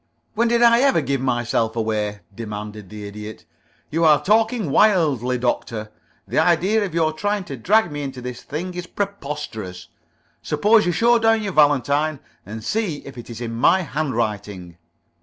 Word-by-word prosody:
"When 235 +2 +2
did 235 +1 +3
I 235 0 +6
ever 275 -10 +4
give 135 -1 -1
myself 120 -3 0
away?" 105 -2 -2
demanded 105 -2 -7
the 105 -1 -8
Idiot. 105 +1 -9 0.5
"You 165 +2 0
are 155 -2 +5
talking 220 - +2
wildly, 145 - +3
Doctor. 115 -3 -2 0.4
The - - 0
idea 180 +6 +3
of 185 -4 -4
your 160 -2 +2
trying 205 +4 -1
to 140 - -7
drag 200 - +2
me 145 0 -4
into 135 -2 -5
this 125 -1 -7
thing 175 +5 -5
is 180 0 -6
preposterous. 145 - -5 0.5
Suppose 210 +7 +3
you - - +3
show 235 +7 +3
down 225 -1 +3
your 195 -2 -3
valentine 145 0 +2 0.3
and 110 +1 -7
see 195 - -2
if 135 - -10
it 120 -1 -10
is 115 0 -8
in 115 -1 -4
my 170 +11 +3
handwriting." 105 - -3
145 Hz, 165 wpm, -21 LUFS, 115-190 Hz, 0.5 s, I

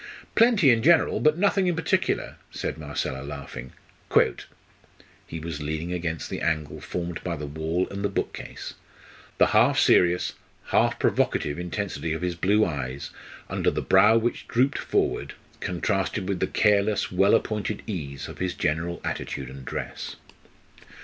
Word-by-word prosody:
"Plenty 225 - +5
in 115 -1 +3
general, 165 +6 +4
but 155 +1 +3
nothing 195 0 +2
in 175 - +1
particular," 165 - 0
said - - -4
Marcella, 75 -3 -3
laughing. 70 -2 -7 0.4
"Quote." - - +2 0.8
He 80 - -6
was 80 -2 -5
leaning 80 +4 -3
against 85 -2 -3
the - - -5
angle 75 -3 -1
formed 85 -2 -4
by 85 -2 -2
the 75 -1 -5
wall 80 +5 -1
and 100 0 -4
the 100 - +1
bookcase. - - -5 0.6
The - - +6
half - - +5
serious, 90 0 +4 0.4
half - - +3
provocative 75 +3 +1
intensity 90 -2 -3
of 80 - -4
his 90 -1 0
blue 100 +5 +3
eyes 70 -3 -4 0.4
under - - +1
the - - -2
brow 105 +4 +6
which 115 +1 -1
drooped 130 +4 +2
forward - - -1 0.2
contrasted 95 +2 -1
with 100 -2 -1
the - - +1
careless, 105 0 +2
well 95 +2 +4
appointed 105 -1 -2
ease 70 -10 -5
of - - -10
his 90 -1 -1
general 80 +3 -1
attitude 70 -3 -4
and 70 0 -9
dress. - - -5
90 Hz, 150 wpm, -26 LUFS, 75-105 Hz, 0.8 s, The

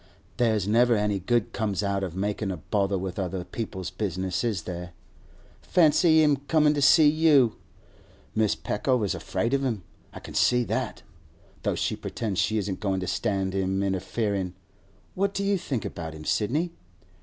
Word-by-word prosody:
There's 110 -5 +1
never 120 +3 +4
any 105 -1 0
good 115 +3 0
comes 105 -3 -1
out 100 -1 -1
of 90 -3 -4
makin' 105 +1 -2
a 95 - -3
bother 100 +4 0
with 95 +1 -4
other 95 -1 -3
people's 95 -2 -5
business, 95 -2 -2
is 105 -8 -1
there? 90 0 -6 0.7
Fancy 160 -1 +4
him 150 -2 +4
comin' 150 -2 +4
to 145 - -1
see 150 +3 +7
you! 150 -6 +4 0.8
Mrs. 110 -2 +1
Peckover's 110 -2 0
afraid 115 +3 -2
of 140 0 +1
him, 115 -8 -2 0.3
I - - -9
can - - -10
see 125 0 +3
that, - - -3 0.6
though - - 0
she - - -1
pretends 105 -5 -3
she 110 - +1
isn't 100 -2 -2
goin' 95 -3 -1
to 95 - -3
stand 95 +1 -1
him 95 0 0
interferin'. 95 0 -1 0.6
What 200 +1 -1
do 200 - -1
you 200 -1 +1
think 130 -8 -3
about 80 -2 -6
him, 75 0 -10
Sidney? 150 +11 0
105 Hz, 165 wpm, -26 LUFS, 95-125 Hz, 0.8 s, see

